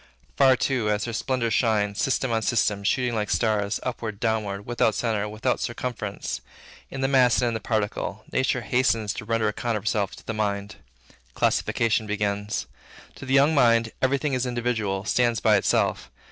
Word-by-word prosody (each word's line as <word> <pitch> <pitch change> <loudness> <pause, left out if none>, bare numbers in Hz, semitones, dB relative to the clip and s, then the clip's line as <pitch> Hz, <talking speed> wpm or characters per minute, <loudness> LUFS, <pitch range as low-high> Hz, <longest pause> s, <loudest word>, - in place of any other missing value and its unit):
Far, 130 - +5
too, 125 -4 0
as 105 0 0
her 120 - -4
splendors 120 -1 -1
shine, 105 -4 +2
system 130 +2 0
on 115 -1 +1
system 105 -3 +1
shooting 125 +3 +1
like 105 -2 -1
rays, 105 -3 0
upward, 115 -5 -4
downward, 105 -3 -1
without 120 -2 +1
centre, 105 -3 -1
without 110 +4 -1
circumference, 120 -4 -4 0.5
in 135 - -6
the 135 - +2
mass 130 -3 +4
and 120 - +2
in - - -3
the 110 - -2
particle, 110 -1 -2
nature 130 -1 +1
hastens 115 -4 +1
to 115 - -7
render 115 -1 +1
account 115 +2 -1
of 100 - -7
herself 105 -2 -1
to - - -16
the 115 - -3
mind. 100 -2 -2 0.6
Classification 115 -1 +1
begins. 105 +1 -2 0.5
To 130 - -10
the 135 - +2
young 140 +3 +5
mind, 115 -5 +4
every 135 +1 +2
thing 145 0 -2
is 130 0 0
individual, 110 -5 -2
stands 120 0 +2
by - - +4
itself. - - +1
115 Hz, 175 wpm, -25 LUFS, 105-125 Hz, 0.6 s, Far